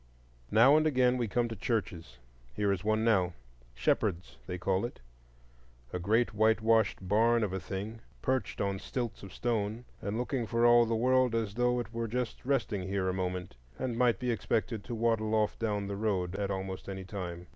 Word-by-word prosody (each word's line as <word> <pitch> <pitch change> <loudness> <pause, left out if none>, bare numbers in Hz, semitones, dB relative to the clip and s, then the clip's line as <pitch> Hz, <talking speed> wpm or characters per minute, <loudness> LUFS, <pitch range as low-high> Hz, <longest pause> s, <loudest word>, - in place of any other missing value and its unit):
Now 115 +7 +6
and 155 0 +3
again 125 -4 +3
we 120 -2 0
come 120 +3 +1
to 115 - -5
churches. 85 - -3 0.4
Here 100 -1 +1
is 95 -2 -2
one 110 +1 +1
now,—Shepherd's, 65 - -1
they 90 - -3
call 95 +1 0
it,—a - - -11
great 110 +6 +2
whitewashed 110 -2 +2
barn 115 +3 +3
of 100 -3 -1
a 95 - -1
thing, 100 +4 -6 0.2
perched 130 -5 -1
on 100 -1 -1
stilts 120 0 -4
of 95 - -10
stone, 115 +2 -2 0.2
and 100 +2 -3
looking 125 -1 -2
for 115 +1 +2
all 120 -1 +6
the 115 - 0
world 125 +1 +3
as 110 -3 -1
though 125 +1 +1
it 115 -1 -6
were 115 0 -2
just 120 0 -3
resting 115 -8 -1
here 95 -1 0
a - - 0
moment 90 -4 -3 0.2
and 125 -3 -2
might 120 -1 +3
be 125 -1 -1
expected 110 -1 -1
to 120 - -4
waddle 110 -1 +1
off 105 -1 +1
down 105 -3 -1
the 100 0 -4
road 100 -4 -1
at 100 0 -2
almost 95 0 -4
any 95 -1 -5
time. 90 -3 -6
105 Hz, 185 wpm, -31 LUFS, 95-115 Hz, 0.4 s, Now